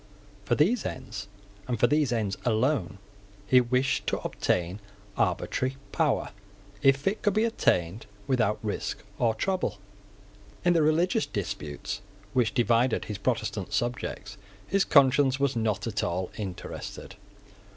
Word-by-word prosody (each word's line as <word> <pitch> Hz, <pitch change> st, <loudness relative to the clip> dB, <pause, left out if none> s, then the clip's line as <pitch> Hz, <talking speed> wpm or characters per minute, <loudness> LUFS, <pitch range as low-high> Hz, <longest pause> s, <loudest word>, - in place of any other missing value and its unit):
For 120 Hz, -, +2 dB
these 200 Hz, -, +3 dB
ends, 110 Hz, -6 st, -5 dB, 0.4 s
and 120 Hz, -3 st, -1 dB
for -, -, +6 dB
these 145 Hz, -1 st, +2 dB
ends 105 Hz, -4 st, 0 dB
alone, 120 Hz, -, +1 dB, 0.5 s
he 125 Hz, +4 st, +6 dB
wished 125 Hz, +2 st, 0 dB
to -, -, +1 dB
obtain 90 Hz, +3 st, -1 dB, 0.4 s
arbitrary 130 Hz, +1 st, 0 dB
power, -, -, +1 dB, 0.5 s
if 135 Hz, +1 st, +4 dB
it 200 Hz, +3 st, 0 dB
could 205 Hz, -1 st, +1 dB
be 215 Hz, -, +3 dB
obtained 95 Hz, -, +1 dB, 0.2 s
without 110 Hz, -4 st, +2 dB
risk 105 Hz, -, -3 dB, 0.2 s
or 115 Hz, -2 st, +2 dB
trouble. 185 Hz, -, -1 dB, 0.9 s
In 175 Hz, -, +5 dB
the 165 Hz, -, +3 dB
religious 170 Hz, +8 st, +2 dB
disputes 100 Hz, 0 st, -4 dB, 0.3 s
which 120 Hz, -3 st, +2 dB
divided 120 Hz, 0 st, +2 dB
his 105 Hz, -1 st, -5 dB
Protestant 105 Hz, -3 st, -2 dB
subjects 105 Hz, -2 st, -2 dB, 0.3 s
his 195 Hz, -, +2 dB
conscience 140 Hz, -1 st, +5 dB
was 140 Hz, -2 st, +1 dB
not 110 Hz, -3 st, 0 dB
at 115 Hz, -2 st, -2 dB
all 90 Hz, +1 st, -2 dB
interested. 95 Hz, -4 st, -6 dB
120 Hz, 130 wpm, -28 LUFS, 105-140 Hz, 0.9 s, for